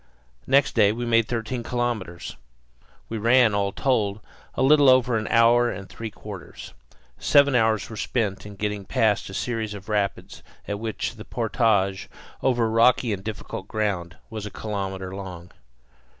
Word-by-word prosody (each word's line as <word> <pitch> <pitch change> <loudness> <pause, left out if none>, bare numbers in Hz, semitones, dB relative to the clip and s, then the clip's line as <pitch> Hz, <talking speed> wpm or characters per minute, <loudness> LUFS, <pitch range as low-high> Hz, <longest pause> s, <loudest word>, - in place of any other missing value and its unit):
Next 140 +1 +3
day 105 -3 +4
we 120 +2 -4
made 115 -1 +3
thirteen 120 +1 -3
kilometres. 115 -8 -3 0.7
We 115 - -4
ran, 115 0 +4
all 100 -1 0
told, 105 -4 0 0.4
a - - +1
little 145 0 +6
over 125 -2 +4
an 110 -1 -1
hour 120 +1 +4
and 100 -3 -6
three 115 -1 -7
quarters. 105 -3 -10 0.5
Seven 140 -1 +4
hours 110 -3 +2
were 110 - -9
spent 105 -2 -2
in 105 0 -10
getting 105 0 -3
past 105 +1 +1
a 95 - -7
series 110 -4 -3
of 100 +1 -11
rapids 100 -2 -2 0.3
at 100 0 -3
which 110 +1 -4
the 105 - -8
portage, 110 -5 0 0.3
over 120 -3 +2
rocky 115 +1 +3
and 95 -1 -5
difficult 105 -2 -6
ground, 95 -8 -2
was 110 -2 -5
a - - -6
kilometre 95 -3 -5
long. 90 -3 -8
110 Hz, 155 wpm, -24 LUFS, 100-120 Hz, 0.7 s, little